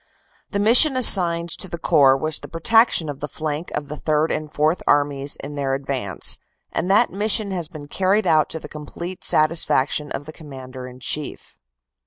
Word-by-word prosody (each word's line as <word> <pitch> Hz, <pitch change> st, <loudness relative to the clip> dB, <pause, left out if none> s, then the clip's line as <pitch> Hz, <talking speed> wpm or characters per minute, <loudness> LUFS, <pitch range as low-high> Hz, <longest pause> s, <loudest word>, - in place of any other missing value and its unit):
"The 200 Hz, -, -3 dB
mission 245 Hz, +7 st, +6 dB
assigned 170 Hz, -8 st, +5 dB
to 190 Hz, -, -8 dB
the 170 Hz, -, -6 dB
Corps 135 Hz, -4 st, +3 dB
was 155 Hz, +2 st, -1 dB
the -, -, -10 dB
protection 225 Hz, 0 st, +2 dB
of 145 Hz, -2 st, -7 dB
the 150 Hz, -, -5 dB
flank 155 Hz, +2 st, -5 dB
of 150 Hz, -1 st, -4 dB
the 150 Hz, -, -7 dB
Third 155 Hz, +1 st, -1 dB
and 155 Hz, -1 st, -4 dB
Fourth 155 Hz, +4 st, 0 dB
Armies 145 Hz, -1 st, +1 dB
in 145 Hz, +1 st, -7 dB
their 140 Hz, -2 st, -2 dB
advance, 135 Hz, -, -1 dB, 0.3 s
and 180 Hz, -, -3 dB
that 210 Hz, +5 st, +3 dB
mission 210 Hz, 0 st, +1 dB
has 175 Hz, -4 st, -3 dB
been 155 Hz, -3 st, -11 dB
carried 195 Hz, +6 st, 0 dB
out 155 Hz, -2 st, +2 dB
to 160 Hz, -, -6 dB
the -, -, -10 dB
complete 170 Hz, +4 st, -9 dB
satisfac 155 Hz, -3 st, +1 dB
tion 150 Hz, -1 st, -4 dB
of 145 Hz, -, -6 dB
the 155 Hz, -, -10 dB
Commander 130 Hz, -4 st, -10 dB
in 125 Hz, 0 st, -14 dB
Chief. 150 Hz, +4 st, -4 dB
155 Hz, 190 wpm, -21 LUFS, 145-180 Hz, 0.3 s, mission